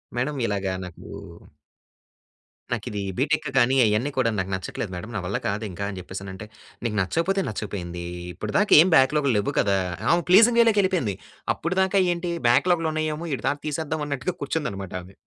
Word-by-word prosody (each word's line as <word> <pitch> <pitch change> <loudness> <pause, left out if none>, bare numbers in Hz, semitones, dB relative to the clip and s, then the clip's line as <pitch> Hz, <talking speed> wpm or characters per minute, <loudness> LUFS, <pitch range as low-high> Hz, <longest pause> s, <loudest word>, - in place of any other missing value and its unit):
Madam 130 +5 -1
ఇలాగా 100 -3 -1
నాకు 90 -2 -11 1.7
నాకిది 105 -1 -4 0.2
బీటెక్ 150 +4 +1
గాని 130 +1 +4
అయన్ని 110 +7 +1
కూడా 130 -3 +3
నాకు 95 0 -2
నచ్చట్లేదు 95 +2 -5
మేడం. 90 +6 -7
నా - - 0
వల్ల 100 - -1
కాదు 105 +3 -2
ఇంక 90 +3 -9
అని 100 - -7
చెప్పేసనంటే, 95 +2 -8 0.4
"నీకు 110 -3 -1
నచ్చకపోతే 170 - 0
నచ్చకపోయింది. 90 -5 -5 0.3
ఇప్పటి - - -6
దాకా 210 - +3
ఏం 185 - +4
బాక్‌లాగ్‌లు 140 -1 +4
లెవ్వు 100 - -1
కదా!" 100 -1 +2 0.3
ఆమె 170 0 +3
ప్లీజింగ్ 230 +5 +7
వే‌లోకి 225 -3 +4
వెళ్ళిపోయింది. 175 - 0 0.4
అప్పటి 180 +3 -3
దాకా 195 +1 +2
ఏంటి? 175 0 -3 0.2
బాక్‌లాగ్‌లు 165 +6 +3
ఉన్నాయేమో, 155 +1 -2
ఈడి 130 - -4
తాట 145 - +1
తీసేద్దాం 155 +1 -2
అన్నట్టుగా 140 +5 -3
కూర్చుంది 150 +2 -1
అన్నమాట 95 -2 -7
ఆమె. 95 +2 -16
130 Hz, 165 wpm, -24 LUFS, 100-165 Hz, 1.7 s, ప్లీజింగ్